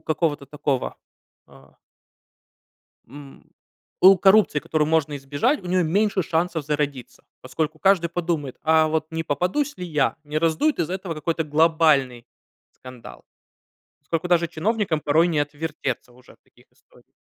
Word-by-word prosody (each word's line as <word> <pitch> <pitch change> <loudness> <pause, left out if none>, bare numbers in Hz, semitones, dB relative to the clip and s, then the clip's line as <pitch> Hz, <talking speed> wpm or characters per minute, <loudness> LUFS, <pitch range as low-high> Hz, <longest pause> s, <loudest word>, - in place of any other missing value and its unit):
какого-то 155 -3 -2
такого, 140 -2 -3 0.5
а - - -20 1.3
м, 140 +1 -13 0.6
у 195 +1 +8
коррупции, 190 -6 +4
которую 155 -1 -1
можно 155 -2 +1
избежать, 145 - -1
у - - -9
нее 180 0 +2
меньше 195 +3 +1
шансов 165 0 -1
зародиться. 145 -3 -4 0.2
Поскольку 155 0 -4
каждый 185 -2 +3
подумает: 165 -6 -3
"А 160 0 +4
вот 155 0 -1
не 165 0 -2
попадусь 180 - -1
ли 180 - -5
я? 150 -3 0
Не 150 +1 -2
раздуют 165 - +1
из-за 175 +2 -1
этого 185 -3 -5
какой-то 160 +1 -2
глобальный 150 -5 +2 0.5
скандал?" 125 -2 -13 0.8
Поскольку 165 +1 -3
даже 170 -1 +3
чиновникам 175 0 -1
порой 155 +4 +2
не 160 -3 -1
отвертеться 145 -4 -4
уже 125 +1 -19
в - - -26
таких - - -26
историях. - - -26
160 Hz, 140 wpm, -23 LUFS, 145-175 Hz, 1.3 s, у